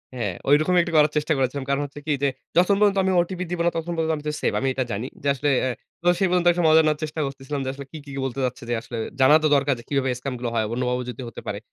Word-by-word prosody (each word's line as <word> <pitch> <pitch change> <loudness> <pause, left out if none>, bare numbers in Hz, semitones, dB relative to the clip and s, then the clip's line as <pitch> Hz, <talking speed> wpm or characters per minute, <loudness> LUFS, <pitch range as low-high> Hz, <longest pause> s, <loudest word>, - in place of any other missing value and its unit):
হ্যাঁ, 105 -6 -2 0.2
ঐরকমই 155 +5 +4
একটি 170 -1 -4
করার 150 0 +5
চেষ্টা 150 +1 +1
করেছিলাম। 135 +1 -1
কারণ 140 +1 +1
হচ্ছে 145 +1 -10
কি 155 - -1
যে, - - +4 0.3
যতক্ষণ 180 +3 +4
পর্যন্ত 205 -1 +3
আমি 190 - +1
ওটিপি 180 +1 -4
দিব 175 - -2
না - - +5
ততক্ষণ 165 +1 -3
পর্যন্ত 160 0 +1
আমি 150 - -9
তো 150 - +1
সেভ - - +1
আমি 135 - -1
এটা 130 - 0
জানি। 110 +5 -3 0.2
যে - - -1
আসলে 140 +2 -1
অ্যাঁ 130 -2 -1 0.3
তো - - -1
সেই 195 - +3
পর্যন্ত 180 -1 +2
একটা 175 - -1
মজা 160 +1 +7
নেওয়ার 150 -1 +1
চেষ্টা 155 +1 -4
করতেছিলাম 135 +1 -5
যে, - - -2
আসলে 140 0 -9
কি, 160 - -7
কি, 145 - -12
কি - - -3
বলতে 135 0 -4
যাচ্ছে 125 -1 -5
যে 120 - +1
আসলে 120 - -7 0.2
জানা 135 +3 +7
তো - - +4
দরকার 140 0 +2
যে - - -11
কিভাবে 135 -2 +1
স্ক্যাম 130 0 -4
গুলো 120 -1 -2
হয়। 110 -1 +1
অন্যভাবেও 125 0 -1
যদি 125 +1 -7
হতে - - -10
পারে। 100 - -3
145 Hz, 285 wpm, -24 LUFS, 130-165 Hz, 0.3 s, মজা